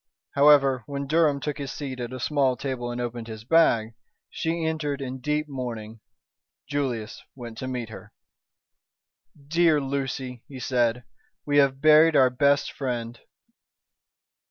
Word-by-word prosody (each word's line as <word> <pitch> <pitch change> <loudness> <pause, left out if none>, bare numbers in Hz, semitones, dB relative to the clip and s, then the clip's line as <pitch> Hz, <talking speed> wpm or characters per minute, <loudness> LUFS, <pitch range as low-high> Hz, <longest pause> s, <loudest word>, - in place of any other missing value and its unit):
However, 140 -2 +5
when 140 -1 -4
Durham 150 -1 +2
took 150 +1 -4
his 140 -2 -4
seat 135 -4 -6
at 120 0 -5
a 130 - -6
small 135 -2 +1
table 130 -3 -4
and 120 0 -4
opened 120 -1 -4
his 110 -1 -8
bag, 115 -6 +3 0.4
she 165 0 -2
entered 155 -3 -2
in 130 -1 -5
deep 150 +3 -1
mourning. 115 -5 -6 0.7
Julius 125 -6 -3
went 120 -3 -9
to 130 - -4
meet 125 -3 -4
her. 105 -1 -11 1.4
"Dear 165 -1 +3
Lucy," 135 -3 -4
he 135 -3 -9
said, 125 -2 0 0.4
"we 145 0 +1
have 135 -1 +3
buried 155 +1 +6
our 130 -2 +5
best 140 +2 +2
friend." 120 -3 -4
135 Hz, 140 wpm, -25 LUFS, 120-145 Hz, 1.4 s, buried